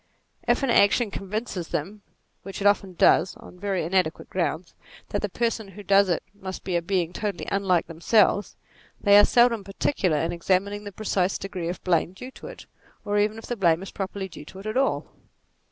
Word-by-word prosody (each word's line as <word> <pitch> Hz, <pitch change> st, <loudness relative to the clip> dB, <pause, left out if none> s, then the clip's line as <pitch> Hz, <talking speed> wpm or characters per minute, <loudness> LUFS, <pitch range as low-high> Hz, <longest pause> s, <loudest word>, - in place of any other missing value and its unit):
If -, -, +2 dB
an 265 Hz, -, +2 dB
action 210 Hz, +1 st, +4 dB
convinces 195 Hz, -3 st, -4 dB
them 185 Hz, +6 st, -4 dB, 0.4 s
(which 195 Hz, -, -8 dB
it 200 Hz, -, -4 dB
oftens 200 Hz, -3 st, +2 dB
does 185 Hz, -, +4 dB
on 180 Hz, -, -14 dB
very 195 Hz, -2 st, -1 dB
inadequate 175 Hz, -1 st, 0 dB
64 185 Hz, -, -2 dB
NATURE -, -, +3 dB
grounds) 165 Hz, +2 st, -10 dB, 0.4 s
that 205 Hz, -, -2 dB
the 210 Hz, -, -2 dB
person 230 Hz, 0 st, -1 dB
who 195 Hz, +2 st, -11 dB
does 195 Hz, 0 st, +4 dB
it 170 Hz, -, 0 dB
must 190 Hz, -2 st, -7 dB
be 185 Hz, -, -2 dB
a 170 Hz, -, +2 dB
being 175 Hz, -1 st, -1 dB
totally 205 Hz, -3 st, -4 dB
unlike 190 Hz, -3 st, +2 dB
themselves, 200 Hz, +5 st, +2 dB, 0.4 s
they 200 Hz, -1 st, +5 dB
are -, -, +7 dB
seldom 240 Hz, -3 st, +4 dB
particular 195 Hz, -, 0 dB
in 165 Hz, +3 st, 0 dB
examining 195 Hz, +4 st, 0 dB
the 205 Hz, -, -6 dB
precise 195 Hz, -2 st, 0 dB
degree 185 Hz, -4 st, -5 dB
of 175 Hz, -, -6 dB
blame 175 Hz, -1 st, +1 dB
due 250 Hz, +7 st, -9 dB
to -, -, -11 dB
it, -, -, -10 dB, 0.4 s
or 205 Hz, 0 st, +1 dB
even 210 Hz, +1 st, +1 dB
if 225 Hz, -, -9 dB
blame 170 Hz, -1 st, +3 dB
is 195 Hz, -, -8 dB
properly 195 Hz, 0 st, -4 dB
due 150 Hz, -4 st, -11 dB
to 190 Hz, -, -12 dB
it 195 Hz, -, -10 dB
at 215 Hz, -, -3 dB
all. 270 Hz, +1 st, +1 dB
195 Hz, 200 wpm, -25 LUFS, 180-205 Hz, 0.4 s, are